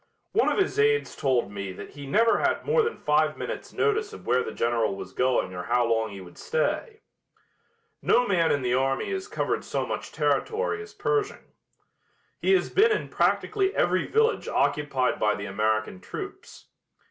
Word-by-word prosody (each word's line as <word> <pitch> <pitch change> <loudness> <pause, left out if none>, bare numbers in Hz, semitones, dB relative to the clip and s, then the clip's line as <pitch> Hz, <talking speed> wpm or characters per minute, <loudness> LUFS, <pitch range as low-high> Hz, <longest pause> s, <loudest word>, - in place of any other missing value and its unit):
One - - +3
of - - -1
his 395 +1 +1
aides 440 0 +2
told 130 -7 0
me 100 -1 -5
that 100 - -9
he 145 -1 -9
never 230 +10 +3
had - - 0
more 465 +1 +3
than 455 0 -2
five 155 +1 +1
minutes' - - -5
notice 435 -1 0
of - - -11
where 125 +1 +2
the - - -4
General 115 -3 0
was - - -8
going 125 -7 +1
or 90 - -4
how 120 +2 +2
long 115 -1 +1
he 100 -1 -9
would 90 -1 -13
stay. 480 -2 -2 1.0
No 245 - +3
man 170 -4 +2
in 145 -2 0
the 125 0 +1
army 135 - 0
has 385 +1 -3
covered 425 - -2
so - - -2
much - - -5
territory 450 -1 0
as 425 - -12
Pershing. 425 0 -2 0.9
He 390 - +3
has 375 - +2
been 440 +3 +4
in 425 - -1
practically 395 -2 +1
every - - +1
village 450 +2 +1
occupied 140 -4 0
by 105 0 +2
the 100 - -6
American 110 0 -1
troops. - - -8
150 Hz, 180 wpm, -26 LUFS, -, 1.0 s, been